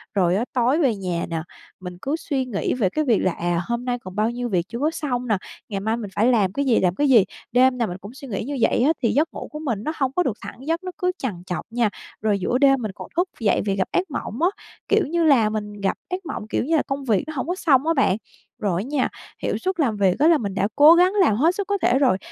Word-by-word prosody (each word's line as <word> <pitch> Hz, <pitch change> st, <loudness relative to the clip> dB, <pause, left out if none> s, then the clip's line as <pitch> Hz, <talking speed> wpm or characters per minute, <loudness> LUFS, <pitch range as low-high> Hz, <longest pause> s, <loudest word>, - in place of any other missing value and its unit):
Rồi 180 Hz, -2 st, +3 dB
á, 220 Hz, +5 st, 0 dB
tối 255 Hz, +5 st, +2 dB
về 255 Hz, -6 st, +2 dB
nhà 180 Hz, -3 st, -3 dB
nè, 165 Hz, -1 st, -2 dB, 0.4 s
mình 180 Hz, -1 st, -8 dB
cứ 285 Hz, +3 st, -1 dB
suy 275 Hz, -5 st, -2 dB
nghĩ 220 Hz, -6 st, -2 dB
về 215 Hz, -7 st, +1 dB
cái 310 Hz, +10 st, -1 dB
việc 230 Hz, -6 st, +3 dB
là, 185 Hz, -, +1 dB
à, 175 Hz, 0 st, -1 dB
hôm 235 Hz, +1 st, -2 dB
nay 245 Hz, -1 st, -1 dB
còn 185 Hz, -4 st, -10 dB
bao 215 Hz, +2 st, +1 dB
nhiêu 245 Hz, 0 st, -4 dB
việc 180 Hz, -4 st, 0 dB
chưa 235 Hz, -, -5 dB
có 300 Hz, +4 st, +1 dB
xong 250 Hz, -6 st, -3 dB
nè, 215 Hz, -4 st, +2 dB, 0.3 s
ngày 200 Hz, -3 st, -2 dB
mai 220 Hz, +3 st, -1 dB
mình 210 Hz, -4 st, -6 dB
phải 220 Hz, -, +3 dB
làm 210 Hz, -7 st, +2 dB
cái 280 Hz, 0 st, -1 dB
gì, 240 Hz, -4 st, +3 dB
làm 180 Hz, -1 st, +1 dB
cái 290 Hz, +3 st, +1 dB
gì. 230 Hz, -6 st, +7 dB, 0.3 s
Đêm 250 Hz, +1 st, +4 dB
nào 235 Hz, -2 st, 0 dB
mình 180 Hz, -, -5 dB
cũng 200 Hz, +4 st, -11 dB
suy 275 Hz, +1 st, -10 dB
nghĩ 220 Hz, -2 st, -3 dB
như 280 Hz, +4 st, -4 dB
vậy 235 Hz, -, +3 dB
á, 295 Hz, -, +4 dB
thì 230 Hz, -, +3 dB
giấc 305 Hz, +4 st, +1 dB
ngủ -, -, -7 dB
của 300 Hz, -, -6 dB
mình 235 Hz, -9 st, -3 dB
nó 310 Hz, -, -1 dB
hông 270 Hz, -3 st, 0 dB
có 360 Hz, -, +3 dB
được 230 Hz, -9 st, -2 dB
thẳng -, -, -9 dB
giấc, 330 Hz, +3 st, -1 dB
nó 365 Hz, -, -5 dB
cứ 360 Hz, -2 st, +1 dB
trằn 195 Hz, -10 st, -4 dB
trọc 180 Hz, -, -3 dB
nha. 235 Hz, -2 st, +1 dB, 0.3 s
Rồi 210 Hz, -2 st, +1 dB
giữa 240 Hz, +6 st, 0 dB
đêm 270 Hz, -1 st, +4 dB
mình 215 Hz, -, -3 dB
còn -, -, -9 dB
thức 360 Hz, +2 st, +2 dB
dậy 220 Hz, -4 st, +2 dB
vì 195 Hz, -, 0 dB
gặp 190 Hz, -1 st, 0 dB
ác 360 Hz, -3 st, -1 dB
mộng 275 Hz, -1 st, -5 dB
á, 350 Hz, -, +4 dB, 0.4 s
kiểu 420 Hz, -6 st, +2 dB
như 340 Hz, +3 st, 0 dB
là 265 Hz, -9 st, +5 dB
mình 210 Hz, -1 st, -4 dB
gặp 195 Hz, -, 0 dB
ác 365 Hz, 0 st, -4 dB
mộng, 215 Hz, -, -5 dB
kiểu -, -, 0 dB
như 325 Hz, -, +1 dB
là, 305 Hz, -, +2 dB
công 275 Hz, 0 st, -3 dB
việc 215 Hz, -6 st, +2 dB
nó 315 Hz, -, -5 dB
hổng 260 Hz, -, -3 dB
có 355 Hz, -, -1 dB
xong 300 Hz, -5 st, +3 dB
á 330 Hz, -, +4 dB
bạn. 265 Hz, -, +2 dB, 0.4 s
Rồi 190 Hz, -5 st, 0 dB
á -, -, -6 dB
nha, 280 Hz, -2 st, 0 dB, 0.3 s
hiệu -, -, 0 dB
suất 375 Hz, -1 st, -3 dB
làm 235 Hz, -9 st, +1 dB
việc 190 Hz, -3 st, +3 dB
á 305 Hz, -, +5 dB
là 335 Hz, -, +6 dB
mình 200 Hz, -7 st, -4 dB
đã 200 Hz, -, +1 dB
cố 295 Hz, +3 st, +8 dB
gắng 360 Hz, +2 st, +4 dB
làm 220 Hz, -, +4 dB
hết 320 Hz, +10 st, +2 dB
sức 405 Hz, -, -3 dB
có 405 Hz, 0 st, +1 dB
thể 255 Hz, -, +3 dB
rồi, 255 Hz, -9 st, +3 dB
245 Hz, 295 wpm, -23 LUFS, 205-295 Hz, 0.4 s, cố